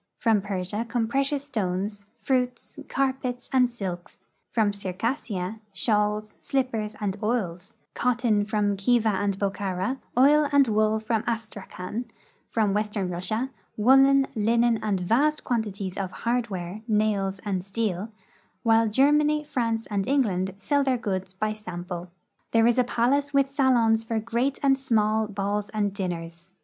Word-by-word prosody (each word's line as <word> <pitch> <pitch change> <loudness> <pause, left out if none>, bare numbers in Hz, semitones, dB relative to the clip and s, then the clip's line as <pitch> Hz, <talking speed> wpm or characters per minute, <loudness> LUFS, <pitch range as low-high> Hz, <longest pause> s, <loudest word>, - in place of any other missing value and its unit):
From 220 -3 +2
Persia 200 +2 -3
come 230 -2 0
precious 275 +3 0
stones, 200 -4 -3 0.2
fruits, 250 +1 -1
carpets, 260 -2 -1
and 250 -2 +4
silks; 185 -7 -6 0.3
from 215 -3 +1
Circassia, 200 0 -3
shawls, 210 +2 0
slippers, 230 -6 -1
and 200 -3 -1
oils; 200 -5 -2 0.2
cotton 240 -4 +1
from 205 -1 0
Khiva 225 +2 +3
and 195 0 0
Bokhara; 195 +4 -2 0.2
oil 290 +3 +5
and 285 -2 +5
wool 215 0 +2
from 220 0 -1
Astrakhan; 215 -1 -4 0.4
from 215 -3 +1
west 210 +1 -1
ern 190 -3 -1
Russia, 215 +9 -2 0.3
woolen, 270 +4 +6
linen, 230 +1 +2
and 205 -3 0
vast 270 +12 +2
quantities 205 -5 -2
of 190 -2 -2
hardware, 210 -4 -3
nails, 210 -3 +1
and 190 -3 -1
steel, 200 0 -2 0.5
while 225 -1 +4
Germany, 295 +6 +3
France, 230 -5 -1
and 200 -2 -1
England 195 -9 +1
sell 285 +8 +1
their 260 -2 +1
goods 190 -4 -3
by 215 +2 -1
sample. 180 -3 -7 0.4
There 225 0 +5
is 240 +1 +4
a - - +5
palace 280 +4 +1
with 275 -1 +3
salons 240 -5 +3
for 225 0 -1
great 235 +5 -1
and 270 -1 +4
small 220 -4 +1
balls 205 0 -2
and 205 -2 -1
dinners. 170 -2 -5
215 Hz, 140 wpm, -26 LUFS, 195-245 Hz, 0.5 s, woolen